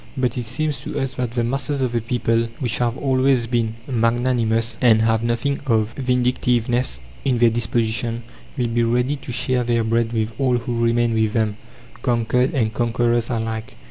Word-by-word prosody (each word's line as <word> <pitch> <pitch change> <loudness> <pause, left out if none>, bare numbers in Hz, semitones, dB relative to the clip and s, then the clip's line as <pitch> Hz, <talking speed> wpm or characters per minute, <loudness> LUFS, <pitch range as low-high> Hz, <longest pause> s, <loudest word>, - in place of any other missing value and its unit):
But 125 -3 0
it 125 -2 -3
seems 150 +6 -1
to - - -4
us 135 -1 -2
that 125 -2 -2
the 120 -1 0
masses 135 +3 -1
of 125 - 0
the 120 -1 0
people, 115 0 0
which 120 -4 -1
have 120 0 0
always 130 -2 +2
been 115 -2 -1
magnanimous, 115 -2 +1
and 110 -3 +5
have 115 0 +2
nothing 120 +4 -1
of 110 -2 +1
vindictiveness 125 - 0 0.2
in 130 -3 +1
their 120 -1 +4
disposition, 115 0 -1 0.3
will 125 - +1
be 120 +1 +1
ready 125 +4 +1
to 135 - -8
share 125 +1 +1
their 120 -1 +1
bread 115 +1 +1
with 110 -1 -1
all 130 -3 +2
who 120 0 -2
remain 115 0 +2
with 110 -1 +1
them, 110 -3 0 0.4
conquered 125 +2 +1
and 110 -4 +1
conquerers 120 0 +1
alike. 115 -2 -3
120 Hz, 175 wpm, -21 LUFS, 115-125 Hz, 0.4 s, and